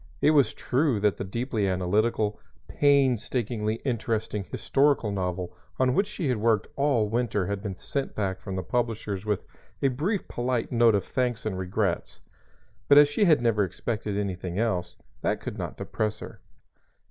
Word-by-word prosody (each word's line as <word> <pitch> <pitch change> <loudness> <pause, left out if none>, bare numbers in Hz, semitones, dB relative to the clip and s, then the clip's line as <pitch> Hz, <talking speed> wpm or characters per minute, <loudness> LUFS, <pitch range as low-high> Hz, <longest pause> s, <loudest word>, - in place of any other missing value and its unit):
It 150 - +4
was 140 -7 +3
true 130 -3 +1
that 105 -1 +2
the - - -3
deeply 110 +1 -1
analytical, 105 +3 +1 0.3
painstakingly 125 -5 +1
interesting 110 -4 -1
historical 140 -6 +2
novel 90 -2 -3 0.2
on 130 -1 +3
which 195 +8 +2
she 190 -6 -3
had 125 -3 +1
worked 110 -1 +2
all 140 -6 +2
winter 110 -3 0
had 100 +1 -3
been 100 -3 -4
sent 135 +8 -4
back 95 -2 -2
from 95 -2 -5
the 95 - -2
publishers 110 -2 -2
with 105 -3 -1 0.3
a 135 - +3
briefly 170 - -1
polite 120 -1 -2
note 115 -3 +5
of 100 - +1
thanks 125 -4 -1
and 105 -3 -1
regrets; 95 0 -2 0.7
but 140 - +7
as 145 0 +8
she 205 +8 +2
had 155 -8 +4
never 110 -3 +3
expected 105 +2 -3
anything 95 -3 -3
else, 105 -6 -1 0.3
that - - 0
could - - -6
not - - -5
depress 110 0 -2
her. - - -10
110 Hz, 165 wpm, -27 LUFS, 100-130 Hz, 0.7 s, as